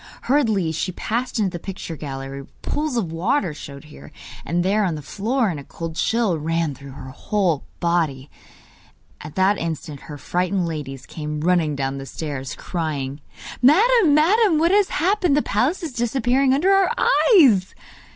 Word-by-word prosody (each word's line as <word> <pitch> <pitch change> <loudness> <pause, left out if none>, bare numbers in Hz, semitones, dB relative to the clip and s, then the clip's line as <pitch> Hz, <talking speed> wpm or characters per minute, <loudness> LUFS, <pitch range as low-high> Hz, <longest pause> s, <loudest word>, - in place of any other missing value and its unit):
Hurriedly 220 - +2
she 165 +4 -2
passed 240 +8 -3
into 200 -4 +1
the 175 - -6
picture 190 -2 -6
gallery, 135 -2 -6
where 135 - -14 0.2
pools 295 -4 -2
of 185 -8 -1
water 180 - 0
showed 140 -1 -10
here 150 -1 -13 0.3
and 175 +1 -1
there 210 +3 +2
on 175 -5 0
the 150 - -7
floor, 225 - -1
and 160 -5 -4
a - - -9
cold 165 +3 -7
chill 205 -1 +1
ran 165 0 -1
through 140 0 -11
her 130 -1 -9
whole 180 0 -1
body. 160 -6 0 1.0
At 150 0 -9
that 190 +2 +2
instant 160 -3 -5
her 145 - -6
frightened 180 +4 -1
ladies 140 -5 -5
came 150 -1 -5
running 165 -3 +2
down 135 0 -2
the 135 - -8
stairs, 140 -4 -5
crying: 145 -5 -4 0.4
'Madam! 365 - +5
madam! 370 +3 +4
what 335 +3 +3
has 405 -1 +3
happened? 360 -3 +1
The 295 - +2
palace 275 - 0
is 310 -5 -5
disappearing 250 +3 +1
under 310 +9 +3
our 390 +1 +4 0.4
eyes! 220 - +5
180 Hz, 170 wpm, -22 LUFS, -, 1.0 s, Madam